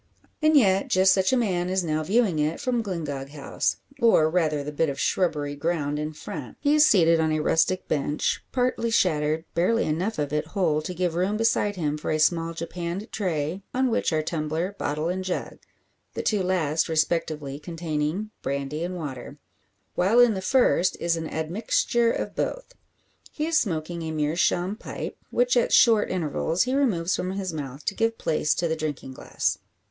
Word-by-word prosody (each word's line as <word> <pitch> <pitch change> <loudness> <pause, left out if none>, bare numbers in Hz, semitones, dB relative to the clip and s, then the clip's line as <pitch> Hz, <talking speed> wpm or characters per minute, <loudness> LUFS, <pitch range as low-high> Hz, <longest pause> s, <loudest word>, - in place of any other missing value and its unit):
And 310 0 +5
yet 195 -6 +3
just 190 0 +4
such 190 -1 +2
a 260 - +3
man 180 -6 0
is 190 0 0
now 155 -2 -1
viewing 195 -1 +1
it 150 +2 0
from 245 -2 0
Glyngog 150 -9 -4
House, 145 -1 -2 0.2
or 160 -9 +5
rather 155 -4 +1
the 150 - -5
bit 150 +1 0
of 140 - -5
shrubbery 150 -6 0
ground 150 -1 -1
in 150 +1 -3
front. 150 -3 -8
He 290 0 +2
is 305 0 +6
seated 165 - +4
on 160 -1 +1
a 155 - +1
rustic 165 +4 +1
bench 145 0 -1
partly 250 -2 0
shattered, 160 -6 +1
barely 185 +7 +2
enough 180 +8 -1
of 145 -1 -2
it 150 - -1
whole 160 -5 +2
to 180 +4 -6
give 175 -1 0
room 185 +5 0
beside 220 -2 +1
him 150 -4 -2
for - - -4
a 155 - +1
small 165 +1 +1
japanned 170 +5 -5
tray, 170 -2 -2
on 260 -1 +2
which 225 - +1
are 155 -1 +1
tumbler, 160 +4 -2
bottle 150 +2 -1
and 185 +2 -2
jug 185 -1 -4 0.6
the - - -3
two 210 -3 +1
last 165 -4 0
respectively 155 -3 -1
containing 165 +4 -3
brandy 140 +3 -3
and 180 +1 -3
water; 140 -4 -7 0.6
while 200 +7 +3
in 245 -2 +6
the 190 - -4
first 215 -5 +2
is 170 0 +1
an 160 -1 -4
admixture 215 +8 0
of - - -3
both. - - -3 0.6
He 305 - -3
is 325 -1 +3
smoking 170 -2 -3
a 160 - -4
meerschaum 170 +5 0
pipe, - - -6
which - - +2
at - - +2
short 225 -3 +5
intervals 165 0 0
he 255 - -2
removes 195 -11 +1
from 185 +1 -3
his 190 -3 -3
mouth 140 -2 -6
to - - 0
give 225 +1 0
place 155 -1 0
to 170 - 0
the 160 - 0
drinking 150 -4 -5
glass. - - -2
170 Hz, 185 wpm, -25 LUFS, 155-200 Hz, 0.6 s, is